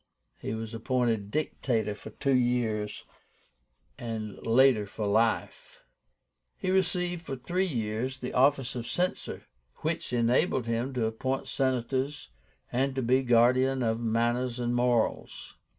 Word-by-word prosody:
He 110 - -3
was 110 0 -6
appointed 115 -3 0
Dictator 115 -5 -1
for 105 - -10
two 140 -1 -1
years, 120 -4 0 1.0
and 110 -3 -4
later 120 -3 +5
for 105 +2 -4
life. 110 +3 0 0.7
He 185 - -1
received 180 -2 +1
for 140 -5 -5
three 175 +9 -1
years 120 -1 -2
the 125 -1 -5
office 135 0 +3
of 120 -2 -5
Censor, 180 +1 -2 0.4
which 160 -2 -2
enabled 125 +3 +2
him 115 +3 -1
to 120 -3 +1
appoint 130 +4 -2
Senators, 130 +2 -1 0.4
and 130 +2 0
to 130 - -1
be 130 +3 +3
guardian 130 +2 +3
of 115 0 0
manners 120 +2 0
and 120 -1 -1
morals. 120 -2 0
125 Hz, 130 wpm, -29 LUFS, 115-135 Hz, 1.0 s, later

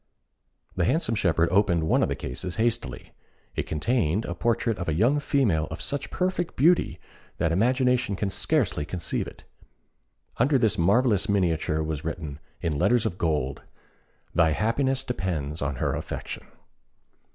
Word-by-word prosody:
The - - +1
handsome 160 -7 +1
shepherd 85 -5 +2
opened 90 -4 +3
one 80 - +2
of - - +2
the - - -1
cases 90 +8 -5
hastily. 115 +1 -2 0.4
It - - -2
contained 90 - +1
the 85 - -4
portrait 115 +3 0
of 85 - -2
a 75 - 0
young 120 - +3
female 110 - +1
of 80 - -6
such 140 -1 -2
perfect 180 -2 -1
beauty, 165 +6 +3 0.4
that 80 - +1
imagination 125 +2 +2
can 100 0 -2
scarcely 120 - +1
conceive 80 +3 -3
it. - - -12 0.9
Under 135 +4 +3
this 110 -5 +2
marvellous 105 +3 +3
miniature 80 -5 +1
was 75 -2 -3
written, 75 -2 -5 0.2
in 75 -3 -1
letters 120 +5 +3
of 90 -4 -2
gold 75 -5 -1 0.7
"Thy 80 -2 +4
happiness 130 - 0
depends 85 - -3
on 70 -1 -1
her - - -1
affection." - - -5
95 Hz, 150 wpm, -26 LUFS, 80-125 Hz, 0.9 s, Thy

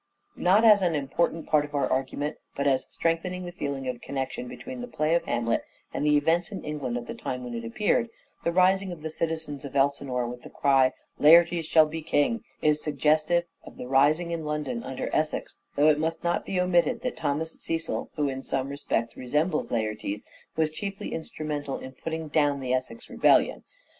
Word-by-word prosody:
Political - - -9
Not 195 +5 +5
as 205 - -2
an 175 -3 +2
important 155 +3 -1
part 150 -2 +3
of 145 0 -7
our 140 - +2
argument, 135 +3 -2 0.2
but 140 - -1
as 135 -2 +2
strengthening 180 +2 -1
the 175 - -6
feeling 140 -6 -4
of 125 -1 -2
a - - -23
connection 140 - -4
between 250 0 -7
the 245 - -5
play 155 -8 0
of 170 - +2
Hamlet 115 -1 0 0.3
and 150 - 0
events 165 +5 +3
in 195 - -6
England 140 -5 -3
at 120 - -5
the - - -6
time 125 0 -5
when 120 -1 -6
it 115 -1 -4
appeared, 210 - +1 0.3
the 170 - +1
rising 190 +2 +3
of 165 -3 -9
the 160 - -4
citizens 160 -3 -3
of 140 -1 -8
Elsinor 135 -2 +1
with 125 0 -7
the - - -11
cry 135 -2 +3
" - - -39
Laertes 170 +1 +6
shall 160 -1 +6
be 160 +1 -5
king," 160 +9 +1 0.2
is 150 0 +3
suggestive 155 +3 +2 0.2
of - - -13
the 125 - -6
rising 150 +6 +3
in 165 -1 -3
London 150 +11 -2
under 130 - -4
Essex, 155 0 -1 0.2
though 150 +2 +5
it 150 -1 +3
must 160 +2 -2
not 175 0 0
be 190 - 0
omitted 180 +7 +2
that 250 - -2
Thomas 155 +3 -1
Cecil, 165 0 -2
who 150 -2 +1
in 135 -1 -3
some 135 0 -2
respects 120 -5 -2
resembles 150 +6 0
Laertes, 110 -3 -2 0.3
was 155 -1 +1
chiefly 195 +4 -5
instrumental 150 -3 -4
in 130 - -8
putting 160 +4 -5
down 145 -2 +2
the 130 -1 -1
Essex 130 - -3
rebellion. - - +3
150 Hz, 200 wpm, -27 LUFS, 135-170 Hz, 0.3 s, Laertes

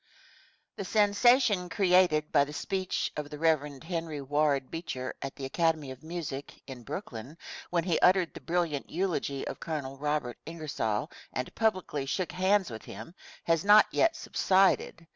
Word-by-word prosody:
* 310 0 -27
[* 300 0 -45
The - - -3
sensation 205 -1 +3
created 180 -6 +3
by 145 -2 +5
the 150 - -9
speech 190 +3 -2
of 150 -1 -4
the 150 - -7
Rev. 150 -3 0
Henry 165 -3 -4
Ward 140 -1 0
Beecher 130 -6 -4
at 135 - -5
the 135 - -6
Academy 155 -1 0
of 130 - -10
Music, 160 -4 -6
in 130 -3 -9
Brooklyn, 135 - -7 0.3
when 170 -1 +1
he 175 -2 +1
uttered 185 -2 +3
a - - -8
brilliant 165 -5 -1
eulogy 160 -6 -2
of - - -6
Col. 140 -4 -4
Robert 145 -4 -2
Ingersoll 150 -10 -3 0.2
and 125 - -4
publicly 185 -10 0
shook 185 +5 -2
hands 190 -3 +2
with 110 -1 -8
him 110 - -9 0.3
has 165 -1 +1
not 210 +1 +8
yet 330 0 +3
subsided. 190 - +2
165 Hz, 160 wpm, -29 LUFS, 140-185 Hz, 0.3 s, not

